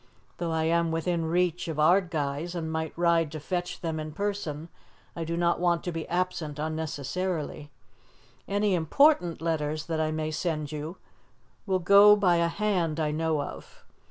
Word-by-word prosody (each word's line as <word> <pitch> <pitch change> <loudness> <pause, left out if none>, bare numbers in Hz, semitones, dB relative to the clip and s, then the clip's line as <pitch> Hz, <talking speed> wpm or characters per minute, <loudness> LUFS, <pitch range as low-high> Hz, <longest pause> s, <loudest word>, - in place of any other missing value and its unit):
Though 170 - -2
I 160 -1 0
am 170 +1 +2
within 165 +1 -1
reach 175 +1 0
of 160 -2 -4
Ardguys, 160 -1 +1
and 160 -2 -3
might 160 -1 -2
ride 170 -3 +2
to 155 - -4
fetch 175 +4 -4
them 160 -2 -2
in 155 0 -6
person, 185 -7 -3 0.5
I 170 - -3
do 165 +1 -3
not 170 0 +1
want 175 -1 +1
to 175 - -3
be 165 -1 -5
absent 175 -4 -2
unnecessarily. 155 0 -3 0.8
Any 205 0 +1
important 175 - +3
letters 155 -2 -1
that 160 -1 -2
I 155 - +1
may 155 0 -2
send 155 -2 -2
you 155 +4 -5 0.7
will 190 -1 +2
go 200 +3 +7
by 185 -4 +3
a 170 0 +2
hand 170 -4 -1
I 155 -1 0
know 155 -1 0
of. - - -10
165 Hz, 165 wpm, -27 LUFS, 155-180 Hz, 0.8 s, go